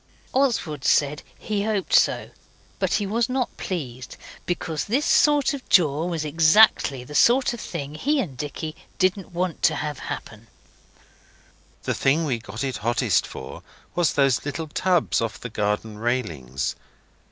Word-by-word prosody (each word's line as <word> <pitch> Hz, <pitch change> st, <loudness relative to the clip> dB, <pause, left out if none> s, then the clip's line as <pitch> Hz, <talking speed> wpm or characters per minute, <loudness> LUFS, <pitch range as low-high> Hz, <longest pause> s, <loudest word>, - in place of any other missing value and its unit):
Oswald 230 Hz, -, 0 dB
said 150 Hz, 0 st, +2 dB, 0.2 s
he 210 Hz, -2 st, -2 dB
hoped 210 Hz, -3 st, -1 dB
so, -, -, +3 dB, 0.5 s
but -, -, 0 dB
he 205 Hz, -, 0 dB
was 225 Hz, +4 st, 0 dB
not 255 Hz, -1 st, -1 dB
pleased. 130 Hz, -9 st, -5 dB, 0.3 s
Because 165 Hz, -3 st, -2 dB
this 265 Hz, +8 st, 0 dB
sort 295 Hz, -2 st, +4 dB
of 275 Hz, -2 st, -8 dB
jaw 160 Hz, -2 st, +4 dB
was 165 Hz, -3 st, -2 dB
exactly 155 Hz, -, +4 dB
the 150 Hz, -, -11 dB
sort 245 Hz, -, +4 dB
of 240 Hz, -, -7 dB
thing 140 Hz, +1 st, -5 dB
he 285 Hz, -, 0 dB
and 165 Hz, -, -3 dB
Dicky 150 Hz, +3 st, -5 dB, 0.2 s
didn't 185 Hz, 0 st, 0 dB
want 175 Hz, -1 st, -2 dB
to 175 Hz, -, +3 dB
have 150 Hz, -3 st, -4 dB
happen. 110 Hz, +1 st, -7 dB, 1.4 s
The -, -, -1 dB
thing 150 Hz, +5 st, +2 dB
we 125 Hz, -6 st, -1 dB
got 110 Hz, +1 st, -6 dB
it 135 Hz, -2 st, -2 dB
hottest 120 Hz, -, +1 dB
for -, -, -9 dB, 0.3 s
was 175 Hz, -3 st, +2 dB
those 135 Hz, -4 st, +2 dB
little 145 Hz, +2 st, -4 dB
tubs 180 Hz, -2 st, +1 dB
off 115 Hz, -1 st, -3 dB
the 125 Hz, -, -6 dB
garden 105 Hz, 0 st, -2 dB
railings. 80 Hz, -, -2 dB
155 Hz, 150 wpm, -24 LUFS, 125-195 Hz, 1.4 s, sort